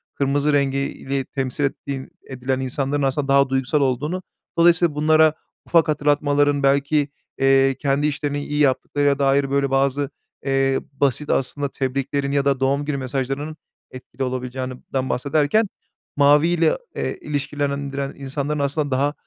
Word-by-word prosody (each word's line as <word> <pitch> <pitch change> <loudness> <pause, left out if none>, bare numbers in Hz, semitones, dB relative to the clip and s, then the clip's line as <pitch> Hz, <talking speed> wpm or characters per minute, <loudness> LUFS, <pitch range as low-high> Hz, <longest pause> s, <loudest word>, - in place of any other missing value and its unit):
kırmızı 145 +2 +1
rengi 140 -1 +2
ile 140 0 -3
temsil 135 +1 -3
ettiğin 140 -1 -3 0.2
edilen 130 0 -2
insanların 135 +2 -1
aslında 135 +1 0
daha 140 0 +4
duygusal 135 +3 +1
olduğunu. 150 +8 -1 0.3
Dolayısıyla 170 -2 +4
bunlara 155 +1 +4 0.3
ufak 165 -1 +3
hatırlatmaların 145 -1 +2
belki, 140 +1 +2 0.3
eee, 135 0 +4
kendi 140 +1 +1
işlerini 145 0 -2
iyi 150 0 -2
yaptıklarına 140 +1 +2
dair, 140 0 +2
böyle, 140 0 +1
bazı, 135 +1 +1 0.4
eee, 135 -1 +2
basit 140 +1 0
aslında 140 +2 0
tebriklerin 140 +1 -2
ya 140 -1 +1
da 140 -2 +2
doğum 140 +2 +1
günü 145 -1 -2
mesajlarının 135 +3 -3 0.4
etkili 130 +1 -7
olabileceğinden 130 +1 -4
bahsederken 145 - +1 0.5
maviyle, 155 +4 +4 0.2
eee, - - -3
ilişkilendiren 140 -1 -3
insanların 140 +2 -3
aslında 145 +1 -1
daha, 140 +3 +1
140 Hz, 130 wpm, -22 LUFS, 135-145 Hz, 0.5 s, daha